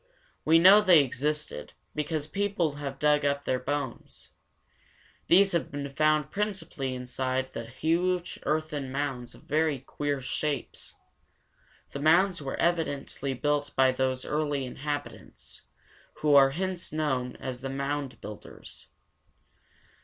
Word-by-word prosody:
We 160 +1 +6
know 190 +5 +8
they 180 -7 +7
existed, 150 +4 -2 0.2
because 150 0 -2
people 180 -4 -1
have 140 -2 -5
dug 150 -1 +3
up 140 0 0
their 130 -2 0
bones. 135 -1 -4 1.0
These 195 +3 +6
have 170 -2 0
been 145 -1 -4
found 155 +1 +2
principally 190 -10 -3
inside 130 +1 -2
huge 165 +10 -1
earthen 150 -3 -2
mounds 135 -3 -3
of - - -17
very 155 -1 +1
queer 145 +2 -3
shapes. 140 +2 -3 1.0
The 140 - -5
mounds 170 +4 +4
were 135 -2 -4
evidently 145 -5 -1
built 145 +1 -1
by 130 0 +5
those 130 0 -1
early 145 -3 -1
inhabitants, 145 +3 -6 0.5
who 150 -1 +1
are 135 -1 +8
hence 185 +4 -3
known 130 -5 -1
as 130 -1 -6
the 135 - -4
mound 140 -2 -3
builders. 105 0 -10
145 Hz, 125 wpm, -28 LUFS, 135-155 Hz, 1.0 s, know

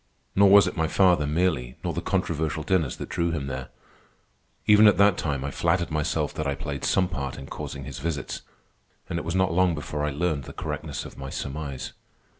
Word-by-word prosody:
Nor 100 0 +6
was 100 -1 +8
it - - -3
my 80 -2 +1
father, 90 -5 +3
merely, 75 -6 0
nor - - -1
the - - -2
controversial 80 0 -1
dinners, 80 -5 +1
that - - -6
drew 85 0 0
him 80 -5 -2
there. 65 -1 -5 1.0
Even 105 0 +7
at 105 - +5
that 100 -1 +5
time 70 -5 -2
I 70 - -3
flattered 85 +3 0
myself 75 -1 0
that 75 - -3
I 70 - 0
played 70 -2 -5
some 95 -1 +2
part 70 -7 -4
in 70 - -8
causing 70 0 -6
his - - -7
visits, 80 0 -3 0.7
and 85 - -1
it - - -7
was 85 +2 -2
not 95 -2 +2
long 90 -1 +3
before 75 0 -4
I 75 - +1
learned 75 -2 -1
the - - -9
correctness - - -4
of - - -11
my 70 0 -5
surmise. 70 -1 -5
80 Hz, 210 wpm, -26 LUFS, 70-90 Hz, 1.0 s, was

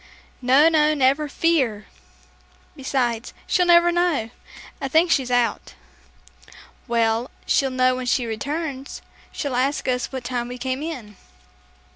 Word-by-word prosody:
"No, 265 +5 +5
no, 305 -2 +3
never 280 +2 +2
fear. 265 -11 0 0.9
Besides, 245 -4 -2
she'll 360 -1 +2
never 345 0 +6
know. 340 -10 0 0.5
I - - -1
think 325 +5 +3
she's 265 -5 +2
out." 245 -3 0 1.1
"Well, 230 +1 +1 0.2
she'll 270 - +2
know 255 0 +2
when 255 -1 -5
she 245 0 +1
returns. 275 +5 -5 0.3
She'll 280 -4 -4
ask 270 +3 0
us 250 -1 -1
what 260 -2 -5
time 245 -1 -3
we 250 +1 -7
came 260 +2 -3
in." 250 - -7
260 Hz, 130 wpm, -22 LUFS, 245-300 Hz, 1.1 s, never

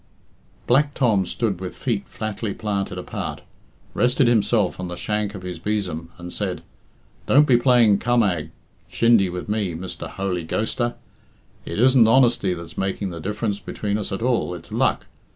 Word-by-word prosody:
Black 145 +3 +3
Tom 105 -8 +2
stood 100 -6 -2
with 90 - -5
feet 115 -6 -2
flatly 110 -1 -4
planted 100 -4 -3
apart, 90 - -5 0.5
rested 125 +1 +3
himself 110 -4 +2
on 90 - -3
the 90 - -5
shank 105 +1 -2
of 95 - -8
his 90 -1 -6
besom, 90 -6 -2
and 90 0 -7
said, 95 -3 -3 0.6
"Don't 145 +3 +6
be 130 - +4
playing 120 -4 +4
cammag 100 -10 +1 0.4
(shindy) 115 -5 +4
with 90 0 -5
me, 105 -5 -1
Mr. 90 +2 -6
Holy 95 -3 -3
Ghoster. 120 +7 -1 0.7
It - - -4
isn't 125 0 +6
honesty 120 -5 +4
that's 85 -1 -8
making 95 0 -2
the 85 -1 -7
diff'rance 105 +2 -2
between 105 0 -3
us 105 - -3
at 100 +3 -3
all 120 -7 0
it's 85 -1 -11
luck. - - +1
105 Hz, 160 wpm, -23 LUFS, 90-120 Hz, 0.7 s, Don't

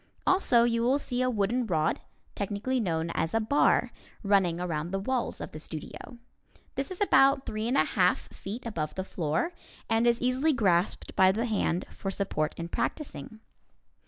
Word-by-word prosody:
Also 265 -11 +4
you 230 -1 +1
will 255 +4 +3
see 250 -3 -3
a 255 - +2
wooden 230 +2 0
rod, 160 -4 0 0.3
technically 210 +6 -2
known 165 -5 -1
as 165 +3 -1
a - - +4
"bar," 225 +7 +2 0.3
running 190 -4 +2
around 170 -2 -2
the 195 - -2
walls 245 +5 -2
of - - -6
the 155 - -8
studio. 160 +10 -8 0.6
This 275 - -3
is 370 - -6
about 275 -8 +4
three 215 +1 -3
and 255 +3 +1
a - - +5
half - - +2
feet 220 +7 -7
above 165 -10 -3
the 190 - -2
floor, 170 - -2 0.3
and 225 +1 +2
is 235 0 +3
easily 260 +5 +2
grasped 190 -7 +1
by 190 0 +6
the 225 +5 -1
hand 200 -6 0
for 195 - -5
support 190 -6 -1
in 170 - -4
practicing. 260 - -4
215 Hz, 175 wpm, -28 LUFS, 180-250 Hz, 0.6 s, by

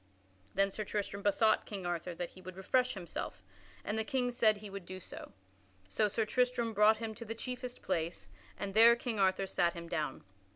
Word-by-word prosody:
Then 195 +1 +3
Sir 215 - -3
Tristram 200 -1 -3
besought 210 +2 +3
King 195 -3 -5
Arthur 175 0 -2
that 175 0 -4
he 185 - -14
would 185 0 -9
refresh 250 +6 +1
himself, 170 - -5 0.4
and 215 +2 -1
the - - +1
King 250 0 0
said 220 -3 +4
he 210 +1 -8
would 200 -1 -6
do 185 0 -6
so. - - -9 0.6
So 210 - +2
Sir 220 +2 0
Tristram 245 -1 +1
brought 210 +1 +6
him 225 -1 -4
to 235 - -8
the 225 0 -5
chiefest 250 +1 -5
place, 165 - -2 0.3
and 195 -1 -4
there 230 +2 +8
King 235 -3 -3
Arthur 190 0 +3
sat 175 -2 +1
him 170 0 -7
down. 155 -3 -2
210 Hz, 200 wpm, -33 LUFS, 185-230 Hz, 0.6 s, there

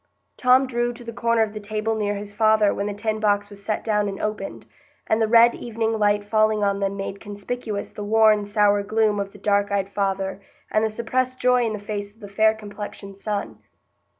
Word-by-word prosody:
Tom 255 +1 +4
drew 240 -1 -1
to 240 +1 -12
the 230 0 -7
corner 230 -1 +2
of 215 -1 -4
the 215 - -5
table 215 +1 -2
near 205 -1 -1
his 205 0 -7
father 215 -1 +3
when 200 - -2
the 205 - -3
tin 215 +1 -2
box 205 -1 +1
was 200 0 -11
set 215 +1 -2
down 210 -2 +1
and 195 - -6
opened, 215 0 -4 0.4
and 220 +1 +1
the 220 - +3
red 235 +1 +6
evening 225 -1 -2
light 205 0 +2
falling 215 0 +2
on 200 0 +1
them 200 0 -1
made 195 0 -5
conspicuous 205 +1 -5
the 210 - -7
worn, 215 0 +4
sour 205 0 +2
gloom 215 0 +1
of 200 0 -3
the 205 - -14
dark 200 0 +1
eyed 200 -1 0
father 195 -1 -2 0.3
and 215 - +2
the 220 - +1
suppressed 255 +4 -1
joy 250 0 +3
in 220 - -1
the - - -3
face 205 0 -5
of - - -26
the 205 - -9
fair 220 +2 +3
complexioned 205 -2 -8
son. 205 -1 -3
210 Hz, 215 wpm, -23 LUFS, 205-225 Hz, 0.4 s, red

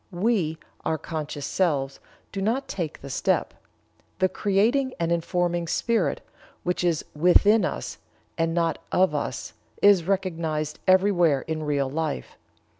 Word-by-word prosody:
We 180 -4 0 0.3
(our 160 - 0
conscious 150 -2 -5
selves) 140 -7 0 0.3
do 195 - -4
not 235 +7 0
take 170 -6 -4
the 140 - -8
step. - - 0 0.6
The 185 - +2
creating 220 +8 +1
and 170 0 0
informing 175 0 0
spirit, 230 +6 0 0.4
which 180 0 -1
is 170 -3 +1
within 190 +7 +5
us 65 - -3 0.4
and 165 0 0
not 165 -2 +1
of 185 -4 +3
us, 145 - -3 0.3
is 200 -5 +5
recognized 165 -5 -1
everywhere 185 -6 +4
in 160 -1 -4
real 145 -2 0
life. 150 - -3
170 Hz, 130 wpm, -25 LUFS, 155-195 Hz, 0.6 s, within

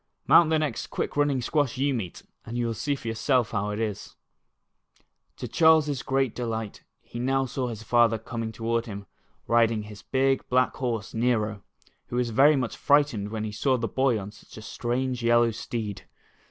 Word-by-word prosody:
Mount 165 -2 +6
the 160 - +3
next 150 -7 -2
quick - - -4
running 145 -3 +1
squash 145 -2 0
you 140 +1 +1
meet, 105 -9 -5 0.2
and 115 +1 -6
you 120 - 0
will 115 - -1
see 140 +7 -1
for 125 - -9
yourself 115 +1 +1
how 100 +1 -1
it 105 +1 -3
is. 110 -3 -4 1.2
To - - -5
Charles's 155 -4 +4
great 135 -3 0
delight 115 -3 -4 0.2
he 120 - -8
now 135 +2 +1
saw 130 0 -3
his 110 -2 -6
father 120 0 +3
coming 115 0 -5
toward 115 +1 -2
him, 100 -2 -7 0.4
riding 115 -2 +2
his 105 -2 -11
big 135 +3 +1
black 130 0 +2
horse 115 -5 -3
Xero, 110 -3 0 0.5
who - - -6
was 125 -1 0
ver} 140 +6 +5
much 125 -3 -2
frightened 140 -8 +2
when 110 0 -4
he 110 - -4
saw 130 +5 +1
the 115 -1 -2
boy 130 +1 +1
on 100 +1 -7
such 105 - -16
a 110 - -9
strange 125 +2 -2
yellow 120 0 +4
steed. 110 -2 -5
120 Hz, 185 wpm, -26 LUFS, 110-135 Hz, 1.2 s, Mount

